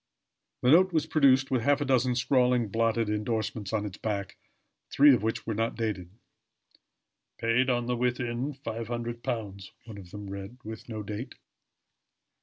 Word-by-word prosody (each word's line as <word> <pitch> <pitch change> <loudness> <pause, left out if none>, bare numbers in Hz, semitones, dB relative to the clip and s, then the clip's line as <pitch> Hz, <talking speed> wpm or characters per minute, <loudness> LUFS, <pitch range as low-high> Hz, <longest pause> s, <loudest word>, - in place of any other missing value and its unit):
The 125 - +5
note 185 +4 +6
was 160 -3 +1
produced, 135 -4 +3
with 130 -3 +2
half 145 +4 +3
a 145 - -1
dozen 130 -2 +2
scrawling, 125 -2 +2
blotted 115 +1 +1
indorsements 105 -1 -2
on 105 -2 -1
its 100 -2 -7
back, 100 -3 -3 0.5
three 145 0 +7
of 120 - +2
which 110 +1 -2
were 110 - -2
not 115 +2 -1
dated. 105 -6 -3 1.3
"Paid 115 +3 +2
on 120 -1 +1
the 125 0 0
within 125 +2 -1
£500," 115 -4 -4 0.2
one 110 -3 -9
of 90 -3 -12
them 105 +2 -8
read 100 +4 -7
with 110 +2 -8
no 110 -2 -5
date. 105 +5 -6
115 Hz, 155 wpm, -28 LUFS, 105-125 Hz, 1.3 s, three